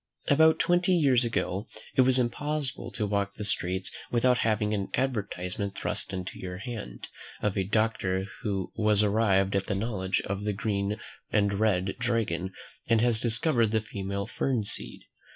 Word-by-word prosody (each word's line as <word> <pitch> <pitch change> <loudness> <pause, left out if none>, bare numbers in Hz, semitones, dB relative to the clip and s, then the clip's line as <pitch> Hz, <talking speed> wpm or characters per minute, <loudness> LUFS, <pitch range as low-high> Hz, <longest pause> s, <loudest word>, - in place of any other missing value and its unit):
About 160 +2 +6
twenty 180 +1 +3
years 135 -7 +4
ago, 110 -3 -1 0.3
it - - +6
was 130 0 +5
impossible 145 +3 -1
to 105 - -1
walk 100 -1 -1
the 105 - -4
streets 95 -1 0 0.2
without 125 +1 +3
having 110 -1 +1
an 100 -2 -2
advertisement 100 -6 -2
thrust - - -2
into 95 -1 -5
your 90 -1 -5
hand, 105 - -6 0.3
of 105 -1 -1
a 95 - +1
doctor 100 -2 0 0.2
"who 100 -3 -2
was 105 -1 +3
arrived 100 -2 +2
at 100 - 0
the - - 0
knowledge 95 -3 -1
of 100 +1 -4
the 105 0 0
'Green 100 0 -1 0.3
and 100 -1 +2
Red 95 -2 +1
Dragon,' 110 -7 0 0.4
and 115 -1 +4
had 120 -1 +3
discovered 120 +1 +2
the 110 +1 +2
female 100 -1 -4
fern 120 0 -1
seed." 100 - -4
105 Hz, 160 wpm, -28 LUFS, 95-120 Hz, 0.4 s, About